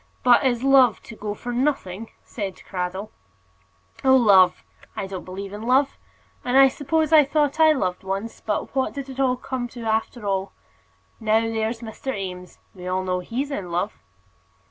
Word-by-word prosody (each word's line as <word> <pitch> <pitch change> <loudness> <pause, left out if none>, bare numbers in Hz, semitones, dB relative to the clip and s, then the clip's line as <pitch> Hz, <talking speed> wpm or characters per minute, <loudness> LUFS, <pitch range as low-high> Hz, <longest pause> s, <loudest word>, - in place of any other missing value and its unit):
"But 245 +2 +6
is 245 -2 +1
love 265 -5 +5
to 225 - -11
go 210 -1 -5
for 245 +3 -6
nothing?" 235 -6 -1
said 195 -5 -6
Cradell. 190 +2 -4 0.9
"Oh, 265 0 +6
love! 190 -7 +5 0.3
I - - -3
don't 190 -1 -6
believe 195 +2 -7
in 210 - -7
love. 260 +4 +2 0.5
I 265 +2 +6
suppose 310 +3 0
I 310 -1 +9
thought 290 +1 0
I 315 -1 +7
loved 185 -12 -1
once, 195 +4 -4
but 215 +4 -3
what 265 -1 0
did 275 -1 -6
it 260 -1 0
come 260 -2 -3
to 240 0 -10
after 220 +1 -1
all? 195 -1 -1 0.7
Now, 220 0 +2
there's 225 +1 -2
Mr. 230 +2 -5
Eames 180 -2 -7 0.2
we 180 -1 -9
all 185 +1 -1
know 185 -1 -1
he's 250 +10 -4
in 195 -10 -4
love." 180 +5 -2
225 Hz, 165 wpm, -23 LUFS, 195-265 Hz, 0.9 s, I